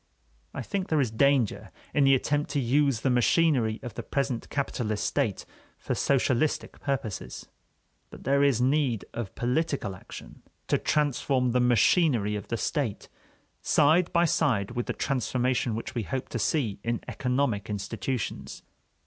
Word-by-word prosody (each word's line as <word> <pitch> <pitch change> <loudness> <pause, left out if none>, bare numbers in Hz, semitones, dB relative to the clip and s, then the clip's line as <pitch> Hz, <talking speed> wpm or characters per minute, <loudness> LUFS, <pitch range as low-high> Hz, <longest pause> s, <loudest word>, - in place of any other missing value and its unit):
I - - -5
think 195 -2 -3
there 155 - +2
is 125 -6 +1
danger 135 -1 +2 0.2
in 145 - +4
the 135 0 +6
attempt 145 +3 0
to 145 0 0
use 135 -1 +2
the 130 - +1
machinery 125 -3 +2
of 120 - -6
the - - -5
present 135 -4 -2
capitalist 120 -6 -2
state - - -1 0.3
for - - -3
socialistic 135 +1 0
purposes. 110 - -4 0.6
But - - -12
there 140 +1 +2
is 140 -5 +3
need 130 -3 +1
of 115 -5 -5
political 125 -4 -1
action - - -11 0.3
to - - +2
transform 135 -3 +1
the 125 - +2
machinery 120 - +3
of 105 - -6
the 115 - -2
state, 135 -5 -2 0.5
side 160 +4 +3
by 170 0 +3
side 115 - +1
with 120 0 -3
the - - -1
transformation 125 -3 0
which 115 - -5
we 120 - -1
hope 130 +5 -4
to 120 - -3
see 110 -4 0
in 115 0 -1
economic 125 -6 -1
institutions. 105 +4 -4
125 Hz, 150 wpm, -27 LUFS, 115-140 Hz, 0.6 s, the